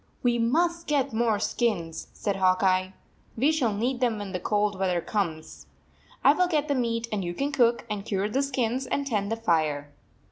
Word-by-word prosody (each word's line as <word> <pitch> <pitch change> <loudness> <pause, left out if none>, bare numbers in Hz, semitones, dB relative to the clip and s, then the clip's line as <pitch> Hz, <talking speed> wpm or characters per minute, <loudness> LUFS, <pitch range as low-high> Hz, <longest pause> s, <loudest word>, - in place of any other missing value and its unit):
"We 240 -1 +2
must 335 +8 +1
get 280 -4 +1
more 225 -1 +2
skins," 200 -7 -1
said 200 -2 -2
Hawk 185 0 +3
Eye. 185 0 +2 0.4
"We 275 +7 +3
shall 270 -8 +1
need 240 +5 -1
them 240 -4 +1
when 205 -2 -6
cold 205 +1 0
weather 180 -2 +1
comes. 165 -7 -4 0.6
I 280 - +7
will 360 +3 +2
get 305 -4 0
the 285 - +1
meat, 230 -3 -1
and 205 -3 -1
you 175 0 -4
can 280 +7 -1
cook, 240 -4 +2
and 210 -2 -4
cure 200 -1 -1
the 260 +6 0
skins, 260 -2 -1
and 280 - -1
tend 210 -5 -1
the - - +1
fire." 155 -9 0
225 Hz, 190 wpm, -26 LUFS, 195-260 Hz, 0.6 s, I